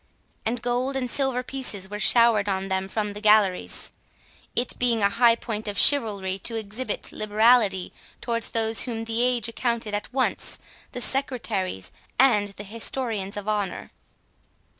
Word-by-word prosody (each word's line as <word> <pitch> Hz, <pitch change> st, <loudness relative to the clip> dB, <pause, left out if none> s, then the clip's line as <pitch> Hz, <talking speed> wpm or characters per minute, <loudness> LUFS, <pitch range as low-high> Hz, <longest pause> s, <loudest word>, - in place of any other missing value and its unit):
and 235 Hz, +1 st, -2 dB
gold 250 Hz, +3 st, -1 dB
and 250 Hz, -2 st, -2 dB
silver 265 Hz, -3 st, +1 dB
pieces 250 Hz, -8 st, -2 dB
were 210 Hz, +1 st, -7 dB
showered 230 Hz, -3 st, +4 dB
on 190 Hz, 0 st, -2 dB
them 190 Hz, 0 st, -1 dB
from 210 Hz, +1 st, -3 dB
the 210 Hz, -, -8 dB
galleries, 210 Hz, -3 st, +2 dB, 0.6 s
it 240 Hz, -, 0 dB
being 235 Hz, -3 st, +2 dB
a 200 Hz, -, +5 dB
high 230 Hz, +2 st, +4 dB
point 220 Hz, -2 st, -5 dB
of 205 Hz, -1 st, -4 dB
chivalry 200 Hz, -9 st, +4 dB
to 230 Hz, -, -3 dB
exhibit 220 Hz, +2 st, -4 dB
liberality 215 Hz, -2 st, +2 dB, 0.3 s
towards 230 Hz, -1 st, -2 dB
those 225 Hz, 0 st, +1 dB
whom 225 Hz, -3 st, -4 dB
the 225 Hz, +1 st, -1 dB
age 245 Hz, -2 st, +2 dB
accounted 230 Hz, -2 st, -2 dB
at 205 Hz, +2 st, -4 dB
once 260 Hz, 0 st, -1 dB, 0.3 s
the 245 Hz, -, -6 dB
secretaries 220 Hz, -, -2 dB, 0.3 s
and 230 Hz, -6 st, +4 dB
the 200 Hz, 0 st, -8 dB
historians 215 Hz, -2 st, -2 dB
of 205 Hz, 0 st, -6 dB
honour. 205 Hz, -3 st, -3 dB
225 Hz, 150 wpm, -24 LUFS, 205-245 Hz, 0.6 s, a